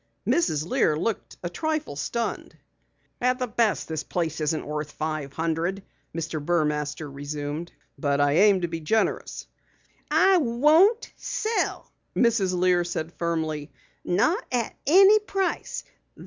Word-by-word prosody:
Mrs. 155 - +1
Lear 170 - +2
looked 220 +6 -3
a 175 - -2
trifle 310 - -2
stunned. 230 - -3 0.6
"At 250 +1 +3 0.2
best 225 -4 +1
the 160 -2 -3
place 165 -3 -2
isn't 155 +1 -1
worth 150 0 -4
five 155 -3 -3
hundred," 165 +5 -1 0.3
Mr. 160 -2 -3
Burmaster 150 -2 0
resumed. 145 +3 -5 0.3
"But 140 -2 +1
I 145 0 +3
aim 200 -1 +5
to 175 - 0
be 165 -1 -4
generous." 215 +8 -1 0.6
"I 385 -1 +5
won't 315 - +4
sell," 445 +1 -2 0.2
Mrs. 205 -6 +2
Lear 180 -1 +3
said 170 -1 -4
firmly. 160 -3 -2 0.3
"Not 320 - +1
at 240 -3 -1
any 390 +7 +7
price. 390 -2 -2
175 Hz, 125 wpm, -25 LUFS, 155-240 Hz, 0.6 s, any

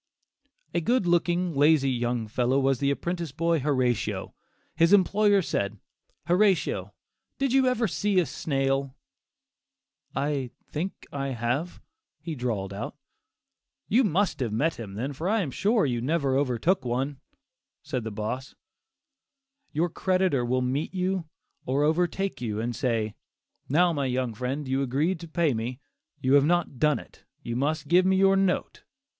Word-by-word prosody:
A 170 - +1
good 240 +4 +2
looking, 175 0 +1
lazy 145 -1 +4
young 120 -2 -1
fellow, 125 +4 +1
was 135 -2 +2
the 140 - +1
apprentice 170 +2 -2
boy 165 +3 +1
Horatio. 130 -5 0 0.4
His 165 +4 +4
employer 205 0 +4
said, 105 -7 -2 0.5
"Horatio, 190 +1 +2 0.4
did 275 -2 0
you 265 -1 +4
ever 245 -2 +2
see 200 +1 +1
a 175 - +2
snail?" 135 -3 -1 1.2
"I 140 -2 -1 0.2
think 175 +6 -5
I 140 -1 -2
have," 125 +9 -2 0.4
he 160 +2 -5
drawled 110 -8 -3
out. 100 - -5 0.9
"You 245 +6 +4
must 195 -4 +1
have 120 -5 -1
met 145 +9 0
him 100 -4 -7
then, 130 +7 -3
for 160 +7 -3
I 220 +1 +2
am 150 -8 -3
sure 210 - +2
you 120 -4 -1
never 140 0 +1
overtook 140 +5 +1
one," 130 +3 -2 0.6
said 135 -5 -3
the 110 - -3
"boss." 110 +5 -4 1.2
Your 165 +3 +1
creditor 185 -7 +1
will 130 +1 0
meet 135 +8 -2
you 185 -1 -1 0.4
or 135 +3 +1
overtake 175 +4 0
you 110 -3 -2
and 120 +1 -2
say, 110 -3 -1 0.6
"Now, 170 +5 +4
my 140 -3 -1
young 125 -2 -1
friend, 130 +5 -3
you 135 +1 0
agreed 145 +7 0
to 170 - -8
pay 160 -3 +1
me; 120 +3 -4 0.4
you 130 +1 +1
have 140 0 +6
not 170 -5 0
done 150 -1 +3
it, - - -13 0.2
you 120 - -4
must 145 +3 -1
give 180 +4 +5
me 190 - +4
your 195 0 +5
note." 195 -1 0
145 Hz, 155 wpm, -27 LUFS, 125-175 Hz, 1.2 s, have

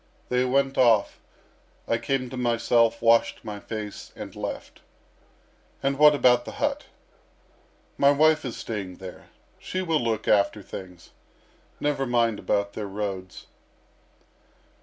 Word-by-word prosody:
They 125 0 +2
went 135 +1 +1
off; 115 -5 +3 0.7
I 115 - +1
came 130 +1 -2
to - - -6
myself, 115 -1 +2
washed 115 0 +3
my 105 -2 -6
face, 105 -1 -7
and - - -8
left." - - -6 1.0
"And 135 +1 0
what 150 0 +7
about 125 -2 +4
the - - -8
hut?" - - -2 1.1
"My 140 - +6
wife 155 +2 +4
is 125 -4 -5
staying 100 -5 -5
there. 95 -1 -10 0.3
She 185 0 -4
will 165 -4 +1
look 110 -2 -2
after 100 0 +2
things. 90 -3 -10 0.7
Never 145 -2 -1
mind 115 -3 +1
about 100 0 -1
their 105 -2 -5
roads." 95 -3 -5
115 Hz, 130 wpm, -25 LUFS, 105-135 Hz, 1.1 s, what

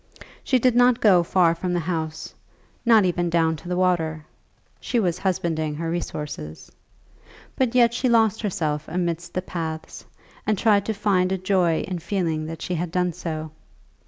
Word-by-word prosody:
She 260 - +2
did 250 -1 +2
not 245 0 +5
go 190 -5 +5
far 170 -1 +3
from 175 +2 -3
the 175 - +1
house, 160 -2 -4 0.5
not 220 -4 +6
even 175 -1 0
down 165 -1 +2
to 175 - -10
the 180 - -1
water. 160 -4 0 0.5
She 240 - -1
was 180 -4 0
husbanding 170 -5 -1
her 165 +1 -3
resources. 150 - -5 0.8
But 250 -2 0
yet 235 -2 +5
she 250 +1 0
lost 225 -2 +3
herself 160 -8 -2
amidst 170 0 -3
the 185 - -1
paths, 160 -3 -6 0.4
and 215 -1 +2
tried 205 -1 +3
to 220 - 0
find 190 -3 +1
a 190 - +1
joy 185 -3 +1
in 180 -2 -4
feeling 165 -4 -2
that 165 0 -7
she 180 - -3
had 175 0 -2
done 180 0 0
so. 155 -1 -5
180 Hz, 170 wpm, -23 LUFS, 160-200 Hz, 0.8 s, not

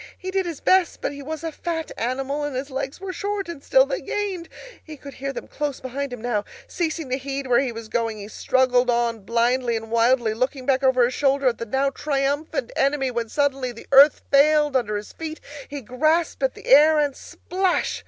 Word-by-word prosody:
He 375 0 -6
did 380 -1 0
his 330 -4 -6
best, 375 -2 +3
but - - -2
he 285 0 -8
was 310 +3 -6
a 325 - -3
fat 325 0 -4
animal, 270 +5 -2
and 290 -2 -3
his 270 +2 -4
legs 270 +2 -4
were 380 -1 -5
short, 400 +1 -3
and 330 -5 -8
still - - +5
they - - -3
gained. 385 -5 -3 0.3
He 310 -1 -10
could 280 0 -10
hear 275 +1 -4
them - - -7
close 290 -2 -3
behind 270 +2 -4
him 245 -3 -7
now. 225 -4 0 0.2
Ceasing 325 - -3
to 260 - 0
heed 275 +1 -4
where 245 -2 +3
he 270 -3 -1
was 230 -1 -8
going, 225 -1 -1
he 205 -1 -8
struggled 250 +2 +2
on 235 -1 +1
blindly 235 +3 +1
and 225 0 -5
wildly, 235 -1 +3
looking 255 +3 -2
back 265 0 +2
over 260 -2 +4
his 250 - -2
shoulder 275 0 +1
at 235 - -5
the 230 - -5
now 270 +4 +1
triumphant 290 - -2
enemy, 270 -1 +1
when 235 -2 -3
suddenly 275 -2 0
the 230 - -12
earth 280 +2 +7
failed 295 0 +4
under 220 -5 +1
his 205 - -8
feet, 320 -1 -6 0.3
he 285 -1 -6
grasped 310 +9 0
at 265 -1 0
the - - -13
air, 305 +3 +6
and, 290 -2 +1
splash! 370 0 -2
275 Hz, 215 wpm, -23 LUFS, 245-310 Hz, 0.3 s, earth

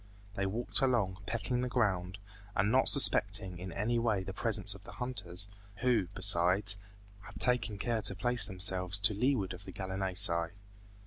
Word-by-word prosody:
They 100 -1 -3
walked 115 +7 -1
along, 110 -8 -1
pecking 120 +2 -3
the 125 - -3
ground, 95 -6 -2 0.4
and 100 +3 0
not 130 +2 +2
suspecting 100 - +3
in 90 0 -8
any 115 +6 -2
way 110 -5 -1
the 95 0 -8
presence 105 -1 0
of 100 -1 -15
the - - -13
hunters, 100 -7 -3 0.3
who, 120 -7 0
besides, 90 +3 +6 0.5
had - - -13
taken 115 -4 0
care 110 +3 -3
to 95 - +3
place 120 +3 +1
themselves 95 -1 +1
to 105 +2 +4
leeward 105 -4 -1
of 90 +1 -12
the - - -9
gallinaceae. 95 -3 0
100 Hz, 165 wpm, -31 LUFS, 95-115 Hz, 0.5 s, besides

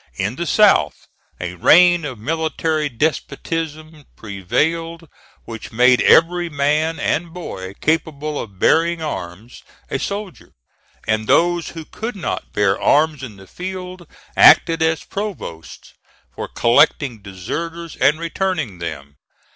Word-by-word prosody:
In 100 - -2
the 170 +3 -4
South, 195 - +3 0.3
a 90 0 -4
reign 175 - +5
of 130 -5 -6
military 155 +3 -1
despotism 155 +2 -3
prevailed, 160 - -2 0.4
which 115 -1 -8
made 125 +2 +4
every 175 +1 +4
man 150 +2 0
and 165 +3 -1
boy 100 - -7
capable 155 -2 -1
of 100 -4 -8
bearing 165 - +2
arms 105 - -7 0.3
a 140 - -1
soldier; 200 +1 -6 0.5
and 110 0 0
those 175 0 +2
who 160 - -7
could 225 +7 -6
not 195 - -4
bear 100 -1 +1
arms 150 -1 +2
in 120 -6 -8
the 95 - -14
field 180 - -7 0.3
acted 165 -1 +6
as 160 -1 +1
provosts 195 - -7 0.4
for - - -6
collecting 120 -1 +2
deserters 165 - -6
and 150 +3 +3
returning 165 - -3
them. 70 -4 -7
155 Hz, 125 wpm, -19 LUFS, 110-170 Hz, 0.5 s, acted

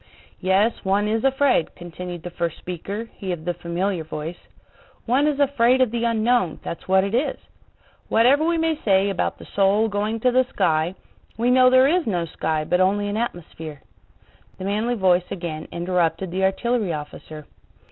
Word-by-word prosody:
"Yes, 195 +4 +1
one 200 +2 +1
is 225 +1 0
afraid," 270 - +2
continued 175 0 -8
the 175 - -6
first 170 -2 -3
speaker, 195 +6 -6
he 190 -2 -4
of 165 -2 -5
the 175 - 0
familiar 175 +1 -2
voice. 160 +2 -7 0.6
"One 265 +5 +2
is 290 -2 0
afraid 260 -3 +3
of 255 -4 +3
the 235 0 -1
unknown, 230 -5 +1
that's 170 - -7
what 190 0 +4
it 200 +2 -3
is. 255 +6 0 0.7
Whatever 255 +7 +4
we 335 +1 +1
may 325 -1 0
say 195 -1 +3
about 190 - -2
the - - -12
soul 200 +3 +2
going 210 +2 -2
to 250 - +3
the 255 +1 +3
sky... 160 -4 +1 0.4
we 240 +2 +2
know 255 0 +6
there 260 +1 +6
is 345 0 +1
no 175 -5 0
sky 155 -1 -2
but 180 +4 +1
only 205 +2 +2
an 205 - -3
atmosphere." 165 -9 -5 0.7
The 185 - -6
manly 215 +5 0
voice 185 -4 +2
again 165 -3 -5
interrupted 175 0 -1
the 190 +1 +1
artillery 210 -1 0
officer. 150 0 -8
195 Hz, 175 wpm, -23 LUFS, 175-235 Hz, 0.7 s, know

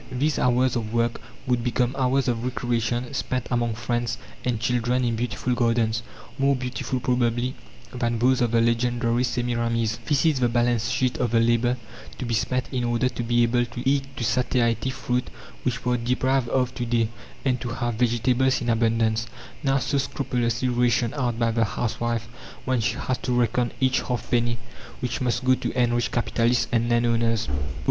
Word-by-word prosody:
These 140 +4 0
hours 125 +1 +2
of 115 -1 -3
work 115 0 0 0.2
would 125 -2 +1
become 125 +1 0
hours 135 0 +1
of 120 -1 0
recreation 120 0 -1
spent 130 -2 -2
among 120 -2 0
friends 120 0 -2 0.3
and 125 -3 0
children 125 +1 +1
in 115 -1 0
beautiful 120 +2 -1
gardens, 115 -2 +1 0.4
more 140 0 +3
beautiful 125 0 -3
probably 125 0 0 0.4
than 120 -2 -1
those 125 +2 +3
of 120 - +3
the 115 0 +3
legendary 120 +1 +1
Semiramis. 120 -2 0
This 145 +1 +2
is 155 -5 +3
the 120 -1 +2
balance 120 -1 +1
sheet 130 -1 0
of 125 - +1
the 115 +1 +3
labour 120 +2 +2 0.4
to 130 - -4
be 120 - -2
spent 120 +3 0
in 125 -2 -1
order 120 +1 +1
to 125 - -5
be 120 0 +2
able 120 +1 +2
to 120 +1 -5
eat 135 -1 0
to - - -2
satiety 120 0 +1
fruit 125 -1 -2 0.3
which 125 -1 -2
we 125 - +2
are - - +2
deprived 125 +1 +1
of 125 -1 +1
to 125 - -3
day, 115 -2 +1 0.4
and 125 -2 +1
to 120 - -3
have 120 0 -2
vegetables 125 +3 +2
in 120 - -2
abundance, 115 0 +1 0.3
now 135 -1 +2
so 135 +2 0
scrupulously 125 -3 -1
rationed 120 -1 +2
out 125 -5 -1
by 115 -1 +2
the 115 0 +2
housewife, 115 +1 -2 0.4
when 130 -2 +1
she 110 - 0
has 130 - -2
to 125 -1 0
reckon 120 0 +1
each 130 0 +2
half 125 -3 -4
penny 120 -1 +2 0.4
which 125 0 -3
must 125 0 0
go 130 - +5
to - - -1
enrich 120 0 +2
capitalists 120 0 +1
and 120 -1 +1
landowners. 115 -1 +2
120 Hz, 180 wpm, -25 LUFS, 115-125 Hz, 0.4 s, go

